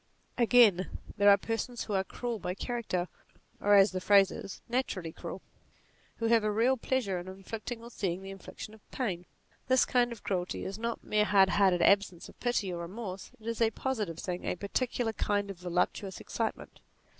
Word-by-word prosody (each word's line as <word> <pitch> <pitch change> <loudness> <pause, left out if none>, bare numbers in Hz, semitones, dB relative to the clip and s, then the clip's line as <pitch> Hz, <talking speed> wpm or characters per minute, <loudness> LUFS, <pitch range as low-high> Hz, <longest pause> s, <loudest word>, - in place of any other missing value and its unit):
Again, 230 -6 +4 0.2
there 205 0 +5
are 200 - +8
persons 225 +3 -3
who 210 - -5
are 190 -1 +2
cruel 235 +3 -4
by 180 -1 -3
character, 210 -6 -2 0.5
or, 205 0 +4
as 195 +1 +6
the 185 0 -3
phrase 195 0 +5
is, 195 - -8
naturally 220 -9 -2
cruel; - - -8 0.7
who 230 - -3
have 225 -1 +4
a 215 - +1
real 230 +5 +3
pleasure 230 -7 -1
in 175 - -8
inflicting, 215 +5 -6
or 235 - -10
seeing 190 -4 -2
the 195 - -7
infliction 195 +2 -9
of 220 - -16
pain. 180 -9 -3 0.4
This 260 0 +4
kind 245 -1 +2
of 230 - -8
cruelty 185 -2 -2
is 195 +2 -5
not 235 0 -3
mere 210 0 +2
hardheartedness, 190 -3 +4
absence 200 -3 +2
of - - -17
pity 215 -7 0
or 170 - -4
re - - -12
morse; 195 -5 -6
it 220 - -17
is 230 0 -3
a 225 - +5
positive 215 -8 -3
thing; 180 0 -4
a - - -1
particular 225 +4 -1
kind 205 -2 0
of 185 - -11
voluptuous 180 +2 -1
excitement. - - -4
205 Hz, 190 wpm, -30 LUFS, 185-230 Hz, 0.7 s, are